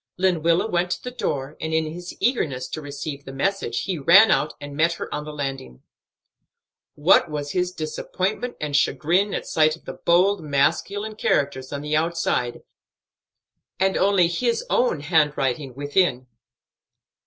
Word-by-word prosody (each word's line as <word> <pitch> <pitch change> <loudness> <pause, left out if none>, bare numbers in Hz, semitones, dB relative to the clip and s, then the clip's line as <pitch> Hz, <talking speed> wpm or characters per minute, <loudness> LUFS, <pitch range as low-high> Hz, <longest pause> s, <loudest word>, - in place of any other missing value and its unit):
Lenwilla 170 -1 +2
went 180 -3 0
to - - -3
the 250 - -5
door, 140 - -3
and 160 0 -2
in 160 0 +1
his 175 +3 -7
eagerness 145 - 0
to 155 - -5
receive 145 0 -6
the 135 - -9
message 135 -3 -1
he 185 -5 -3
ran 190 +10 +7
out 150 - +1
and 145 0 -8
met 165 +3 +2
her - - -6
on 150 0 -4
the 150 - -6
landing. 135 - -6 1.1
What 160 +2 +4
was 145 -1 -4
his 180 0 0
disappointment 185 +8 -3
and 150 -2 -3
chagrin 175 +7 +2
at - - -4
sight 155 -1 +2
of 165 - -22
the - - -6
bold, 180 +3 +2
masculine 165 +9 0
characters 130 -8 0
on 140 -1 -4
the 150 0 -1
outside, 160 -7 -1 1.2
and 190 0 +2
only 190 -3 +3
his 230 +8 -1
own 245 - +2
handwriting 145 -4 0
within! 145 -2 +1
160 Hz, 155 wpm, -23 LUFS, 145-180 Hz, 1.2 s, ran